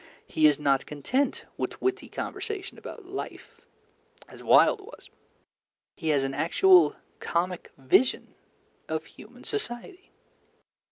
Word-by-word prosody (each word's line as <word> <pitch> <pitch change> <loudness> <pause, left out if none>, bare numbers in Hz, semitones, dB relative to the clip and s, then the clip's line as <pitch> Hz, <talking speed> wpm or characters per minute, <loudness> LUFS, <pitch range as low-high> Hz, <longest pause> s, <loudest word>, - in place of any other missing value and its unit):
He 155 -1 +4
is 150 -2 +3
not 140 -2 +1
content 245 - -1
with - - -4
witty 385 +1 -1
conversation 415 -4 -5
about 445 - -10
life, 375 +2 -8 0.7
as - - -13
Wilde 430 - +5
was: 425 +5 -13 0.8
he 160 - -3
has 145 -3 +3
an 135 0 -2
actual 165 +2 +5 0.2
comic 180 +1 -2
vision 140 - +2 0.6
of - - -2
human - - -15
society. 380 - -5
185 Hz, 115 wpm, -27 LUFS, -, 0.8 s, Wilde